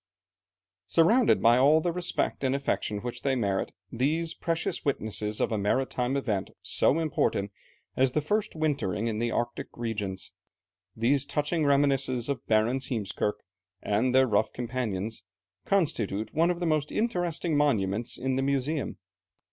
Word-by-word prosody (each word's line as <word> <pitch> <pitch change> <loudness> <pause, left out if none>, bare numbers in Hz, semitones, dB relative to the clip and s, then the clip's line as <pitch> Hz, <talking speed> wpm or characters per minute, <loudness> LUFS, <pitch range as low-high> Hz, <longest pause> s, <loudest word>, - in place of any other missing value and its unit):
Surrounded 220 +9 +4
by 120 +2 +6
all 145 +4 +6
the 175 +2 0
respect 175 -4 -2
and 130 0 +2
affection 135 -6 -1
which 120 0 -4
they 135 -1 +1
merit, 100 -6 -1 0.2
these 155 +7 0
precious 165 -1 -2
witnesses 110 -6 -2
of - - 0
a 110 - 0
maritime 130 +5 0
event 105 -8 -1
so 145 - +2
important 140 -10 0 0.4
as 130 -1 +2
the - - +2
first 210 +7 -1
wintering 140 -10 -1
in 110 -2 -1
the 120 0 0
Arctic 120 +1 -2
regions, 105 -6 -3 0.6
these 125 +4 +2
touching 150 +3 -1
reminiscences 135 -3 +2
of 135 -4 -2
Barentz, 115 +5 +2
Heemskerke, 105 -3 -2 0.4
and 115 +7 +1
their 130 0 +6
rough 110 -3 +1
companions, 115 -4 -3 0.4
constitute 110 - 0
one 165 +3 +3
of 175 -1 -1
the 175 - -1
most 155 -2 0
interesting 175 -7 0
monuments 115 -7 +1
in 130 0 -1
the - - +1
Museum. 140 +2 -1
130 Hz, 145 wpm, -28 LUFS, 110-150 Hz, 0.6 s, by